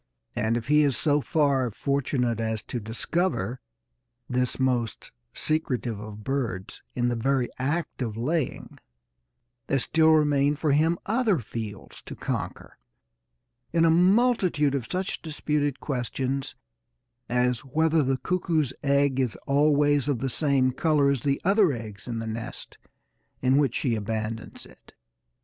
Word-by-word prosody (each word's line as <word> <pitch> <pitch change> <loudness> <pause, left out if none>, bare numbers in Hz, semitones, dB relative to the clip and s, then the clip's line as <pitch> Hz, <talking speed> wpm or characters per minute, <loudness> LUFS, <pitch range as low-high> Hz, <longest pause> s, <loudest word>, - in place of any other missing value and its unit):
And, 110 +2 +1
if 120 0 -6
he 150 +1 +5
is 140 -4 +2
so 145 -1 +2
far 140 -5 +1
fortunate 125 -1 -1
as 110 -1 -2
to 120 - -4
discover 120 - -2 0.7
this 125 0 -1
most 125 -3 -1 0.2
secretive 125 -8 -1
of 105 0 -9
birds 120 -9 -3
in 120 0 +1
the 120 - -1
very 130 +1 +1
act 145 +3 -2
of 110 -3 -3
laying, 150 +4 -2 0.9
there 135 - +2
still 160 +4 +3
remain 145 -2 +3
for 150 0 0
him 160 +4 +3
other 220 -3 +2
fields 110 -4 -7
to - - -9
conquer - - -5 0.9
in 165 0 +3
a 165 - +5
multitude 180 - +3
of 135 -5 -2
such 185 +1 -2
disputed 150 -3 -1
questions 130 0 -3 0.7
as 125 0 +2
whether 160 +3 +1
the 135 -1 +1
cuckoo's 160 -5 0
egg 140 -1 +2
is 125 -4 0
always 145 0 +3
of 145 -4 +1
the 135 +3 -2
same 135 -2 +2
colour 145 0 +2
as 135 -4 -1
the 140 -1 0
other 195 -2 +4
eggs 110 -4 -8
in 120 -2 -3
the 115 - -4
nest 110 +1 -6 0.6
in 130 +1 +4
which 140 -5 +2
she 125 - 0
abandons 110 +1 -4
it. - - -19
135 Hz, 140 wpm, -26 LUFS, 120-150 Hz, 0.9 s, he